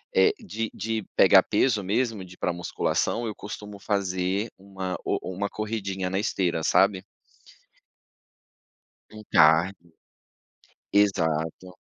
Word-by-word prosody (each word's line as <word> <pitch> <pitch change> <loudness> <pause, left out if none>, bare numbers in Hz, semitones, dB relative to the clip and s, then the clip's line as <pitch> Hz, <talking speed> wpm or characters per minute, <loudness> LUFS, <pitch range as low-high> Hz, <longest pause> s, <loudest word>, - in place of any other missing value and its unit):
eh, 430 - +5
de 115 - -4
de 110 0 -3
pegar - - +7
peso 110 -6 +1
mesmo, 110 0 -1
de 90 0 -13
ir - - -33
pra 90 - -1
musculação, 90 +6 -1
eu 110 -2 -4
costumo 105 0 -8
fazer 100 +1 -1
uma 95 -1 -5
o - - 0 0.2
uma 100 +2 -2
corridinha 100 -3 -3
na 95 - -1
esteira, 90 -6 0
sabe? 95 +1 +3 2.1
Um 110 0 -11
cardio. 85 +3 +4 1.0
Exato. 90 -3 +1
100 Hz, 115 wpm, -26 LUFS, 90-105 Hz, 2.1 s, pegar